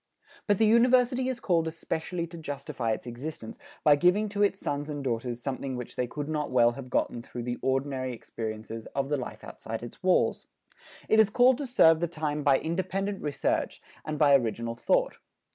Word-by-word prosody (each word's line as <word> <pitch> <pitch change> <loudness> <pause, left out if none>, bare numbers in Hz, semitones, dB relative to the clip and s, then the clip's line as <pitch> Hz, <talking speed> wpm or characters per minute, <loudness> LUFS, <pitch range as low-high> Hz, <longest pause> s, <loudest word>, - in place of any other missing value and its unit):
But 205 -2 +3
the 220 - +4
University 250 +3 +4
is 255 -2 -3
called 170 -6 +1
especially 165 +1 -3
to 170 0 -10
justify 140 -6 -4
its 110 - -3
existence 120 -1 -7 0.2
by 150 -1 +7
giving 180 +7 +3
to 205 0 -3
its 200 -1 +2
sons 145 +1 -3
and 145 -2 -4
daughters 120 -1 -3
something 135 -1 -3
which 125 -1 -7
they 125 - -1
could 145 +3 -5
not 150 -2 -2
well 120 -2 +4
have 125 +1 -9
gotten 120 - -1
through 120 0 -7
the 120 0 -4
ordinary 130 -1 -1
experiences 110 -1 -6
of 140 0 -1
the 145 - +1
life 125 - -7
outside 115 +1 -7
its 120 - -10
walls. 185 -1 +2 0.6
It 220 - +4
is 220 -2 +6
called 245 +4 +4
to 285 - -3
serve 165 -10 +5
the 170 - 0
time 155 -2 -3
by 140 -1 +4
independent 190 +5 -2
research 145 -2 -1 0.2
and 155 0 -4
by 145 -2 +5
original 115 -3 +1
thought. 115 - 0
145 Hz, 190 wpm, -28 LUFS, 125-185 Hz, 0.6 s, by